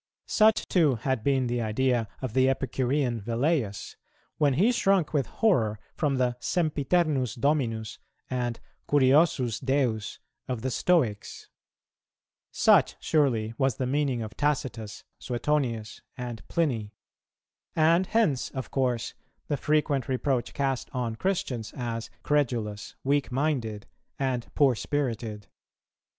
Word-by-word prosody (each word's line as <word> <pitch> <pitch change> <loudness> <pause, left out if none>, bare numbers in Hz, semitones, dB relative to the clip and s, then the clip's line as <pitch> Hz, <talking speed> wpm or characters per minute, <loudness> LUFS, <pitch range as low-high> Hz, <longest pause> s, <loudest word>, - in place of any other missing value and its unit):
Such 215 0 +3
too 155 -8 +3
had 120 0 -2
been 135 -1 +2
the 120 0 -1
idea 115 +1 +1 0.2
of 125 -4 -3
the 130 +1 +4
Epicurean 130 -2 0
Velleius, 115 -1 -1 0.4
when 145 -4 +3
he 205 - +4
shrunk 195 -9 +2
with 140 -4 +1
horror 115 - +1 0.2
from 145 -3 0
the 125 -2 0
"sempiternus 150 -4 +1
dominus" 120 -5 -1 0.3
and 120 -2 -2 0.3
"curiosus 135 -4 +3
Deus" 130 -6 0 0.3
of 125 -3 -3
the 130 - 0
Stoics.[228:1] 125 -9 0 1.0
Such, - - +4
surely, 120 -8 +1
was 135 -1 +2
the 130 - -2
meaning 135 -3 0
of 110 0 -8
Tacitus, 125 -7 -2 0.2
Suetonius, 120 -4 -2 0.2
and 120 -3 -5
Pliny. 120 -11 -1 0.8
And 165 +3 +4
hence 205 - +1
of 130 -1 -6
course 125 -4 0 0.4
the 145 - +1
frequent 145 -2 +1
reproach 130 -1 -1
cast 135 -2 -1
on 120 -3 -2
Christians 125 - -2
as 115 -2 -4
credulous, 120 -8 -1
weak 140 0 +1
minded, 125 -7 -1 0.3
and 130 -3 -1
poor 140 -3 +5
spirited. 115 -5 -3
130 Hz, 120 wpm, -27 LUFS, 115-145 Hz, 1.0 s, poor